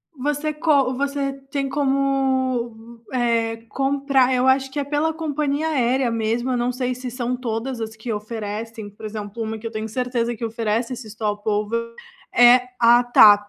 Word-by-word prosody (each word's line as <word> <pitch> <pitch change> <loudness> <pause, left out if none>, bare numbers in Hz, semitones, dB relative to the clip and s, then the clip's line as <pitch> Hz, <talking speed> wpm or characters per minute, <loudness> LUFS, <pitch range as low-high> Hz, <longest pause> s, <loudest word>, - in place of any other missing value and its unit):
Você 295 +3 -1
co 285 -4 +2
você 280 0 -1 0.2
tem 275 -1 -1
como, 260 -4 0
eh, 230 -2 +1
comprar 270 0 +2
eu 255 +1 +2
acho 265 0 +3
que 290 - -3
é - - 0
pela 295 +3 0
companhia 300 -1 -1
aérea 260 -3 +1
mesmo, 230 +3 -1
eu 250 - +1
não 240 +1 0
sei 250 0 -2
se 255 -1 -6
são 250 0 -2
todas 240 +1 -3
as 220 0 -5
que 225 +1 -5
oferecem, 215 0 -5
por 205 +2 -12
exemplo, 215 +1 -5
uma 220 0 -4
que 230 - -5
eu - - -7
tenho 215 0 -4
certeza 240 0 -1
que 230 - -9
oferece 230 +2 -1
esse 240 -2 -8
stop-over 215 +2 -2 0.4
é 245 +1 +7 0.2
a 240 +1 +6
TAP, 205 -4 +7
245 Hz, 170 wpm, -22 LUFS, 225-270 Hz, 0.4 s, é